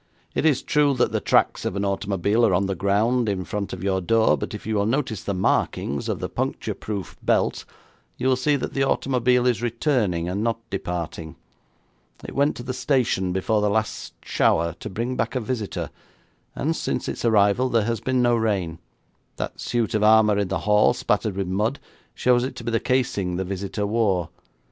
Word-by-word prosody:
'It 160 - +2
is 140 -4 +2
true 145 -2 +2
that 125 - +1
the - - 0
tracks - - +2
of - - -2
an 100 0 -1
automobile 100 +2 0
are 95 - +4
on 95 +3 +1
the 95 - -1
ground 105 +6 +1
in 95 -2 -2
front 100 +3 -4
of 95 -1 -6
your 95 -1 +1
door, 115 +4 +3
but - - -5
if 105 - -9
you 110 - -2
will 100 -1 +1
notice 115 - -1
the - - -2
markings 70 -5 0
of - - -1
the - - -3
puncture - - -3
proof 100 -3 -6
belt, - - +1 0.5
you 130 - -1
will 130 - +4
see 145 +3 +1
that 140 - -3
the 135 - -1
automobile 125 -2 +2
is 120 -3 +2
returning 115 - 0
and 95 +4 -2
not 115 0 0
departing. 85 -4 -4 0.9
It - - -7
went 140 +2 +2
to 120 - -7
the 130 +1 -4
station 125 -8 +1
before 105 +4 +1
the 105 - +2
last 110 +1 -2
shower 85 0 +2
to - - -6
bring 115 +6 -3
back 115 +1 -2
a - - +2
visitor, 110 -3 -4 0.6
and 160 +3 -1
since - - -2
its - - -4
arrival 110 +2 +3
there 115 -4 +2
has 115 -1 -1
been 130 -1 +1
no 120 -1 +4
rain. 95 -8 -1 0.6
That - - -5
suit 120 -3 -1
of 110 - +1
armour 105 -1 +5
in 100 - 0
the - - -2
hall 105 0 +4
spattered 105 -1 0
with 100 0 -1
mud 105 +8 0 0.4
shows 125 -1 +3
it 130 - -4
to - - -8
be 115 - -2
the 115 - +2
casing 105 -8 0
the 95 - -1
visitor 100 +2 -3
wore. 100 -6 +1
110 Hz, 200 wpm, -24 LUFS, 95-125 Hz, 0.9 s, armour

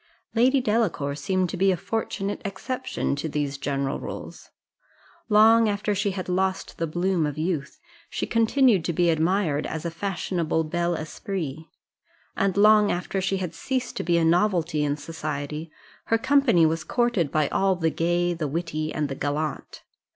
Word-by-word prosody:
Lady 255 +4 +4
Delacour 210 - 0
seemed 185 +6 0
to - - -4
be 195 +1 +4
a 180 - 0
fortunate 205 -1 -3
exception 255 - -3
to 150 +3 -4
these 145 -2 -2
general 140 -1 -2
rules: - - -8 0.8
long 220 +1 +6
after 205 0 -1
she 205 +1 0
had 185 -1 -4
lost 190 +1 -1
the 165 - 0
bloom 175 0 0
of 150 0 -5
youth, 160 - -2 0.3
she - - -2
continued 230 - +3
to 170 - -1
be 175 +1 +3
admired 160 -2 +1
as 160 +1 -5
a 170 - -2
fashionable 170 -3 -1
bel 175 +2 -1
esprit; 160 -1 -5 0.7
and 195 -1 0
long 210 0 +6
after 180 +2 -2
she 195 +1 0
had 180 -3 -4
ceased 255 +8 -3
to - - -2
be 170 0 +2
a 165 - +2
novelty 170 -3 +2
in 145 0 0
society, 150 0 -5 0.4
her 225 - +2
company 255 - +4
was 160 +1 0
courted 240 - 0
by 155 -2 +2
all 195 -1 +2
the 165 -2 0
gay, 175 +2 +1
the 165 -3 -3
witty, 155 0 -3
and 150 -1 -1
the 140 - -4
gallant. 145 +2 -3
175 Hz, 165 wpm, -25 LUFS, 155-200 Hz, 0.8 s, long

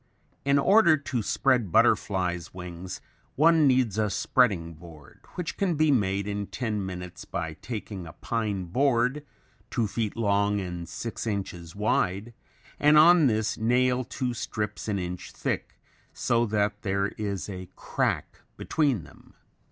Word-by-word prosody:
In 140 0 +4
order 170 +1 +5
to 135 -4 -3
spread 110 -1 +1
butterflies' 90 -3 +1
wings, 90 0 -7 0.3
one 160 0 +5
needs 125 -6 +2
a 105 -1 +2
spreading 95 -5 +1
board, 80 -2 -14 0.2
which 180 -3 -4
can 185 -4 +1
be 155 0 +3
made 100 -5 +1
in 100 -1 -3
ten 110 -5 -3
minutes 90 -1 -7
by 80 -2 -4
taking 105 -6 -6
a 80 - -10
pine 105 -5 -2
board 125 - +1 0.5
two 120 -3 0
feet 110 +1 -2
long, 100 -2 +2
and 90 -3 -5
six 115 0 -5
inches 95 -5 -4
wide 105 +1 0 0.5
and 150 +1 +5
on 165 0 +7
this 110 -1 0
nail 125 +2 +2
two 125 0 -3
strips 105 -3 -4
an 105 -2 0
inch 90 -1 -5
thick, - - -3 0.4
so 120 0 +1
that 105 0 0
there 100 0 0
is 100 -3 -4
a 95 -3 -7
crack - - -2 0.2
between 145 -8 0
them. - - -18
105 Hz, 145 wpm, -27 LUFS, 95-125 Hz, 0.5 s, on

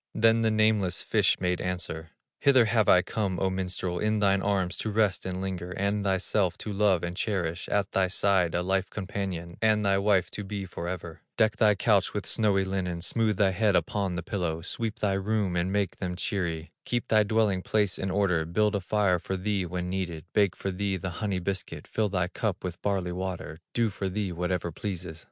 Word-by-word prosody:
Thus 115 0 +4
the 110 - +3
nameless 110 -4 +2
fish - - +2
made 90 -1 0
answer: 85 -3 -4 0.3
"Hither 130 -4 +5
have 110 -2 +2
I 90 - +6
come, 100 -5 -2
O 95 -1 +1
minstrel, 90 -1 -2
In 110 0 +1
thine 100 -2 +3
arms 95 -3 0
to 110 - -2
rest 105 -3 +1
and 95 0 -3
linger, 90 -2 -4
And 100 +1 0
thyself 95 -1 +1
to 105 - -5
love 95 -4 +2
and 90 0 -3
cherish, 90 -4 -2
At 100 -1 0
thy 95 -1 +2
side 95 -2 +2
a 90 - +1
life 95 +1 0
companion, 95 -4 -4
And 110 -1 +3
thy 100 0 +3
wife 100 -2 +2
to 105 - -5
be 100 0 -4
forever; 85 -2 -6 0.2
Deck 110 0 +3
thy 105 0 +5
couch 100 0 +2
with 105 - -2
snowy 100 -4 +2
linen, 95 -3 -2
Smooth 110 +3 +1
thy 100 -2 +4
head 100 +1 +2
upon 100 -3 0
the 85 - -3
pillow, 85 -3 -2
Sweep 110 +3 -2
thy 100 -2 +1
rooms 95 -2 0
and 90 +2 -1
make 100 -1 0
them 90 -1 -3
cheery, 85 -4 -2
Keep 120 -1 -2
thy 110 -1 +5
dwelling 105 -3 +2
place 105 -1 0
in 95 - -2
order, 95 -4 +2
Build 105 +6 +1
a 100 - 0
fire 95 -1 +2
for 95 +3 -3
thee 95 -1 -1
when 90 +1 -3
needed, 90 -4 -3
Bake 100 -4 +3
for 95 - -3
thee 95 +1 -1
the 90 +1 -4
honey 100 -3 0
biscuit, 85 -4 -4
Fill 110 -1 0
thy 90 -3 0
cup 100 +1 -3
with 90 0 -5
barley 95 -3 0
water, 90 -3 -5 0.2
Do 115 -3 +2
for 95 0 -3
thee 100 0 -2
whatever 90 0 -2
pleases. 90 -2 -5
95 Hz, 205 wpm, -28 LUFS, 90-105 Hz, 0.3 s, I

